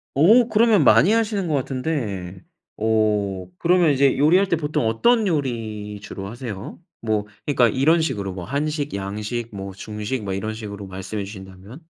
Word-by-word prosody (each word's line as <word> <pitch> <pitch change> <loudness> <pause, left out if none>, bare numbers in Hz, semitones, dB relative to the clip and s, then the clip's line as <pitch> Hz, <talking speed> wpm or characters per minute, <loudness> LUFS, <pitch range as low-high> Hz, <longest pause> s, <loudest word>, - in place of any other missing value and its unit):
어 220 - +6
그러면 220 -2 +4
많이 195 - +6
하시는 215 -5 +1
것 155 - -1
같은데 125 - -3 0.4
어 105 -4 0
그러면 175 -2 +4
이제 140 0 +3
요리할 175 +8 +4
때 - - +3
보통 150 -7 -1
어떤 220 - +3
요리 110 - -3
주로 100 -1 -7
하세요? 110 - -7 0.2
뭐 110 -2 -1 0.2
그러니까 130 -5 +3
이런 155 +8 +3
식으로 105 -11 -2
뭐 90 -1 -6
한식, 145 +2 -2
양식 105 +3 -4
뭐 95 -1 -6
중식 105 +4 -5
뭐 95 - -3
이런 110 +3 -3
식으로 100 -2 -7
말씀해 95 +2 -5
주신다면? 95 - -11
115 Hz, 325 characters per minute, -22 LUFS, 100-155 Hz, 0.4 s, 어